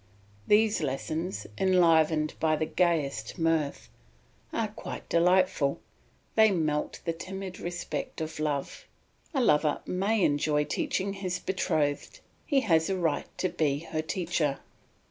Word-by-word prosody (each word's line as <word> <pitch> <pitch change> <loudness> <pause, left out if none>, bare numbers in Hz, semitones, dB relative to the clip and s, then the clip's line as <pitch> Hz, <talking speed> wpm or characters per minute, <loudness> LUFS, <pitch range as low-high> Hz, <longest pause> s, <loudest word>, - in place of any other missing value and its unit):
These 215 -1 +4
lessons, 155 +5 -3
enlivened 165 -5 +4
by 155 -1 +2
the 155 - -1
gayest 150 -11 0
mirth, 160 -3 0 0.6
are - - -1
quite - - -8
delightful, 175 -4 +3 0.5
they 220 -1 +6
melt 155 -6 -1
the 165 - 0
timid 185 +2 -7
respect 175 0 -4
of 160 -1 -5
love; 145 -2 -3 0.4
a 275 -5 0
lover 150 -8 +3
may 195 +3 +1
enjoy 150 +1 +2
teaching 200 - -1
his 185 -2 -3
betrothed 155 - -1 0.3
he 280 -3 +3
has 165 -7 +2
a 190 - 0
right 165 -4 0
to 185 - +1
be 145 -3 0
her 155 - 0
teacher. 160 -4 -1
165 Hz, 125 wpm, -28 LUFS, 150-190 Hz, 0.6 s, they